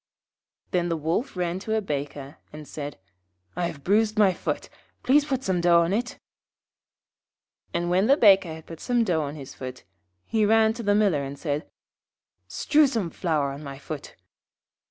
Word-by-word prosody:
Then 175 -1 +1
the 165 - 0
Wolf 165 - -2
ran 175 0 -1
to 220 +3 -2
a - - +2
Baker, 145 -4 -5
and 150 -1 -10
said, 145 -5 -6 0.6
'I 175 0 0
have 140 -4 -9
bruised 215 +4 +2
my 200 -3 +5
foot; - - -3 0.4
please 285 +3 +4
put 265 -3 -2
some 185 -2 0
dough 170 -1 +5
on 170 +3 0
it.' 245 +4 -2 1.5
And 170 0 -1
when 190 +4 +3
the 275 +2 +5
Baker 195 - +6
had 160 0 -9
put 165 -1 -10
some 240 -2 +1
dough 175 -7 +1
on 145 0 -4
his 140 -3 -9
foot, 130 -1 -8 0.4
he 220 -1 +1
ran 220 +1 +4
to 235 - -6
the 205 -2 +2
Miller 200 -9 +3
and 140 +1 -6
said, 150 +1 -3 0.8
'Strew 300 0 +3
some 220 -10 -2
flour 155 -6 0
on 140 +2 -8
my 140 -1 -7
foot.' 145 +1 -8
175 Hz, 175 wpm, -25 LUFS, 150-215 Hz, 1.5 s, Baker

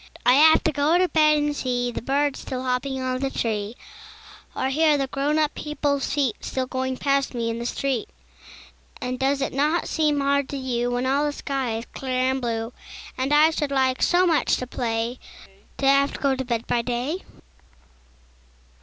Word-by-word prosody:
I 245 - +6
have 315 +4 +6
to 320 - +2
go 300 +3 +2
to 365 0 +3
bed 305 -2 +4
and 295 0 0
see 245 -2 -1
The - - -5
birds 280 +3 0
still 255 -1 -5
hopping 260 +1 -1
on 255 0 -2
the 270 0 -1
tree, 220 -3 -2 0.8
Or 260 - -1
hear 305 +2 +3
the 275 - 0
grown 280 +3 -1
up 305 -1 +1
people's 290 -2 -2
feet 280 -5 0
Still 260 -1 -2
going 260 0 -3
past 275 -1 0
me 230 -1 -1
in 230 - -4
the 235 - -3
street. 265 -4 -2 0.9
And 250 0 -4
does 270 +1 +1
it - - -3
not 300 +5 +1
seem 300 -2 +1
hard 280 0 +1
to 280 - -4
you, 245 -2 -1
When 245 +1 -1
all 275 +3 +2
the - - -1
sky 270 -5 -3
is 230 - -6
clear 255 -1 0
and 265 0 -2
blue, 230 0 -3 0.4
And 260 +2 -2
I 305 +2 +6
should 295 -2 -2
like 260 -2 +1
so 360 +1 +4
much 330 -4 +2
to 255 - -4
play, 235 0 -2 0.6
To 275 - -2
have 275 +1 +4
to - - -7
go 275 -1 +1
to 265 0 -4
bed 235 -2 -2
by 240 - +1
day? 250 +9 -2
270 Hz, 195 wpm, -24 LUFS, 250-290 Hz, 0.9 s, I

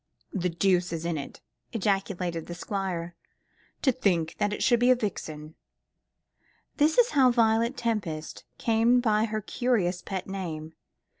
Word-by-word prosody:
"The 180 -2 0
deuce 180 0 +1
is 165 0 -4
in 170 -1 -1
it," 145 - -7 0.3
ejaculated 190 -5 -1
the 175 - -6
Squire; 180 -3 -3 0.7
"to 265 - +5
think 175 -9 0
that 205 -1 +1
it 210 - -2
should 240 -2 +4
be 245 +1 +4
a 255 - +7
vixen!" 155 -9 -5 1.2
This 305 +2 +3
is - - +5
how 265 -3 +5
Violet 230 +1 +2
Tempest 195 -10 -3
came 230 +2 +3
by 220 -3 +2
her 215 -1 -3
curious 200 -6 0
pet 190 -2 -4
name. 165 -5 -5
195 Hz, 145 wpm, -27 LUFS, 175-230 Hz, 1.2 s, a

